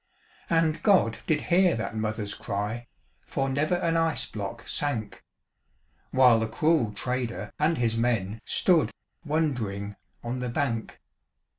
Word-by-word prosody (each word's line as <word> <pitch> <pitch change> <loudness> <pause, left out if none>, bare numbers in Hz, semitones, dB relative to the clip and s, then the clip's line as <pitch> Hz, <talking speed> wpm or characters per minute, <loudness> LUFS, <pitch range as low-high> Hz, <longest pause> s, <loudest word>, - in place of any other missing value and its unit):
And 165 -1 +2
God 180 - +3
did 150 -2 +2
hear 180 0 +3
that 115 0 -4
mother's 110 -1 -2
cry, 105 +5 -4 0.4
For 135 - -1
never 150 +6 +1
an 165 -2 +1
ice 165 -1 +1
block 110 +2 -6
sank; 115 -8 -2 0.9
While 125 -3 +5
the 110 - 0
cruel 150 -1 +2
trader 115 -3 -3
and 155 +2 +2
his 115 -2 +1
men 115 -3 0
Stood 170 -5 +3 0.3
wondering 120 - -1 0.3
on 120 +2 -3
the 125 -1 -2
bank. 115 -2 -2
120 Hz, 130 wpm, -27 LUFS, 110-155 Hz, 0.9 s, While